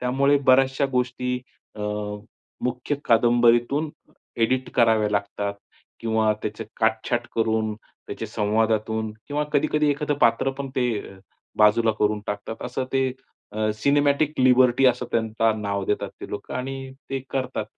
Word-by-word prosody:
त्यामुळे 135 +3 +3
बऱ्याचशा 135 +1 +4
गोष्टी 125 0 -1 0.4
अ, - - -7 0.8
मुख्य 125 +3 -1
कादंबरीतून 120 +5 +3 0.5
एडिट 130 +3 +1
कराव्या 110 -3 +3
लागतात 100 0 -2 0.5
किंवा 110 -1 +2
त्याचे 105 +1 -4 0.2
काटछाट 110 +2 +1
करून 110 -1 +1
त्याचे - - -9
संवादातून 110 +1 0 0.2
किंवा 150 +1 -1
कधी-कधी 150 +1 +2
एखादं 145 +1 -1
पात्र 115 +3 +3
पण 135 0 -6
ते 125 - +2 0.7
बाजूला 110 +2 +5
करून 105 0 +2
टाकतात. 105 +2 -4
असं 130 - -3
ते 135 -1 +2 0.4
अ, 110 0 0
सिनेमॅटिक 145 +5 +2
लिबर्टी 125 0 +5
असं 125 -1 +2
त्यांचा 110 0 +1
नाव 100 -2 -2
देतात 105 - -1
ते - - -7
लोकं - - -6
आणि 135 +1 -5 0.2
ते 135 - -1
करतात. 130 -4 -2
120 Hz, 130 wpm, -24 LUFS, 110-135 Hz, 0.8 s, बाजूला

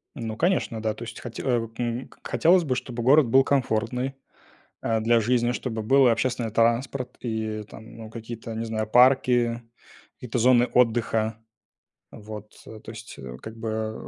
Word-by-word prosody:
Ну, 110 -4 -5
конечно, 165 - 0
да, 110 -1 0
то 115 - -9
есть 115 -1 -8
хоть 120 -2 -8
а, - - -5 0.3
м, 120 +1 -3
к - - -12
хотелось 175 +1 +4
бы, 130 -4 -1
чтобы 125 -2 -5
город 140 +1 +5
был 135 +3 +5
комфортный, 125 0 0 0.7
а, 115 -1 0
для 115 +1 +3
жизни, 120 +1 +1
чтобы 115 -3 -3
был 135 +3 +5
и - - +6
общественный 120 -1 -1
транспорт, 125 +3 0
и 110 -2 -3
там, 110 +2 -13
ну 110 -1 -9
какие-то, 115 0 -7
не 115 +1 -3
знаю, 110 -1 -2
парки, 125 -1 +4 0.5
какие-то 125 0 -4
зоны 125 +1 +5
отдыха. 115 -2 +2 0.7
Вот, 105 0 -9
то 110 0 -11
есть, 115 0 -10
э, 65 -2 -8
как 110 0 -9
бы 110 -1 -3
115 Hz, 165 wpm, -25 LUFS, 110-125 Hz, 0.7 s, и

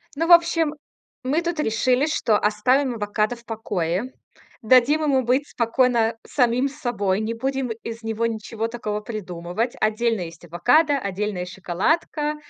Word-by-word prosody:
Ну, 325 +3 0
в 350 - +2
общем, 335 -3 +5 0.5
мы 285 +6 +1
тут 340 -2 -3
решили, 250 +2 +2
что 230 -8 +2
оставим 245 +6 +1
авокадо 210 +2 -1
в 235 0 -18
покое. 205 -1 -2 0.5
Дадим 255 +6 +4
ему 270 -3 +2
быть 260 +4 +1
спокойно 235 -1 +1
самим 250 0 +2
собой. 225 -9 -1
Не 220 +1 -2
будем 265 +1 -2
из 230 0 -6
него 225 +1 -1
ничего 225 0 -3
такого 215 -3 -4
придумывать. 200 +1 -4
Отдельно 220 0 +1
есть 170 0 -8
авокадо, 250 - +3
отдельная 200 -3 -3
шоколадка. 250 - -1
230 Hz, 140 wpm, -23 LUFS, 210-265 Hz, 0.5 s, общем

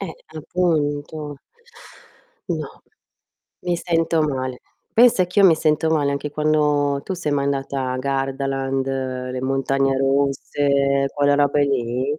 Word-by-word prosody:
Eh, 185 -5 -5 0.2
appunto. 150 -3 -2 1.1
No, - - -5 0.8
mi 175 -1 0
sento 165 -1 +1
male. 130 -4 -2 0.3
Pensa 235 -5 +5
che 180 +3 +1
io 195 - +8
mi 170 - +6
sento 155 0 +1
male 145 -3 +1
anche 140 +1 -4
quando 150 -2 +1
tu 190 - -3
sei 160 -5 -2
mai 140 -1 0
andata 135 -1 -2
a - - -2
Gardaland, 135 0 -2
le 130 -1 -3
montagne 135 0 +1
russe, 140 0 +1
quella 145 -1 +3
robe 145 0 +2
lì? 130 +2 -1
140 Hz, 130 wpm, -21 LUFS, 135-155 Hz, 1.1 s, io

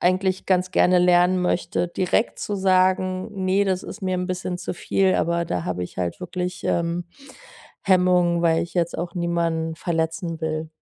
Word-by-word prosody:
eigentlich 185 +1 +1
ganz 185 -1 +1
gerne 180 0 +4
lernen 180 +1 +4
möchte, 175 0 0
direkt 185 +6 0
zu 205 - -3
sagen: 185 +1 +2 0.2
„Ne, 195 +2 +3
das 185 -1 0
ist - - -8
mir 185 -1 0
'n 180 0 -2
bisschen 185 0 -3
zu - - -4
viel,“ 190 +1 +1
aber 170 0 0
da 90 - -2
habe 90 0 -2
ich 90 - -11
halt 90 - -3
wirklich, 180 0 -4
ähm, 170 +1 0 0.8
Hemmungen, 180 -2 +3
weil 165 -1 +3
ich 170 - -7
jetzt 170 -1 0
auch 170 0 -4
niemanden 170 -2 -1
verletzen 165 0 -2
will. 155 0 -3
180 Hz, 170 wpm, -23 LUFS, 170-185 Hz, 0.8 s, gerne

